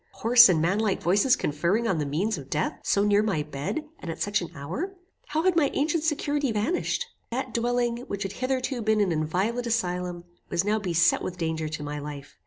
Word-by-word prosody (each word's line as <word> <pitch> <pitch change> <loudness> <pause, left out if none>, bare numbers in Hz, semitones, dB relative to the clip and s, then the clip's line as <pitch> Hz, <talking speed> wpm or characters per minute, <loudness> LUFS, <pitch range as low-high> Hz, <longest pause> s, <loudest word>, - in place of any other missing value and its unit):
Hoarse 235 -1 +7
and 170 -3 +3
manlike 195 +5 +1
voices 200 +9 +3
conferring 170 +10 0
on 185 -7 +1
the 150 - -1
means 185 +10 0
of 135 - -11
death, 155 - -1
so 200 - +2
near 205 0 +4
my 195 -9 0
bed, 150 - -4
and 175 - -7
at 160 - -5
such 205 -1 0
an 175 - -5
hour! 190 - -4 0.3
How 310 +2 -1
had 370 -1 +3
my 310 -4 +3
ancient 305 +2 +1
security 290 -3 0
vanished! 290 - -1 0.2
That 255 0 -3
dwelling, 240 0 0
which 200 -1 -3
had 195 - -4
hitherto 255 +2 -2
been 220 0 +2
an 200 -4 +2
inviolate 185 +10 -1
asylum, 180 -5 -1 0.3
was 170 - +1
now 215 +1 +1
beset 175 -4 +2
with 180 - -5
danger 160 -2 -2
to 150 -1 -5
my 145 0 -4
life. 145 -1 -8
205 Hz, 200 wpm, -26 LUFS, 165-245 Hz, 0.3 s, Hoarse